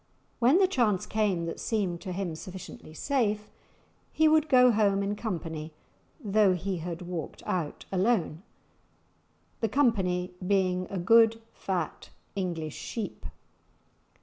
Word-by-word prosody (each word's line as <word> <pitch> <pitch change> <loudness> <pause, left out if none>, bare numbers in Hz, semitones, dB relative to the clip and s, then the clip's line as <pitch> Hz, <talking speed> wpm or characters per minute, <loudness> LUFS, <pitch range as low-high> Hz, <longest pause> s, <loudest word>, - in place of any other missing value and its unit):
When 255 +7 +5
the 385 - +5
chance 225 - +1
came 200 -6 0
that 165 - -5
seemed 190 -6 -1
to 190 - -5
him 180 -2 -3
sufficiently 180 -1 -9
safe, 210 - 0 0.6
he 315 - +3
would 310 0 +4
go 250 -2 +7
home 200 -2 +2
in 200 +1 -1
company 165 -7 -5 0.5
though 205 -2 +3
he 185 +1 -3
had 170 +1 -5
walked 175 -3 -6
out 165 -5 -3
alone; 185 -5 +1 1.2
the 225 - 0
"company" 190 -9 +1
being 185 -2 +1
a 195 - -4
good 225 +5 +5
fat 180 -5 -3 0.3
English 170 -5 -3
sheep. 225 -3 -5
195 Hz, 125 wpm, -28 LUFS, 175-225 Hz, 1.2 s, go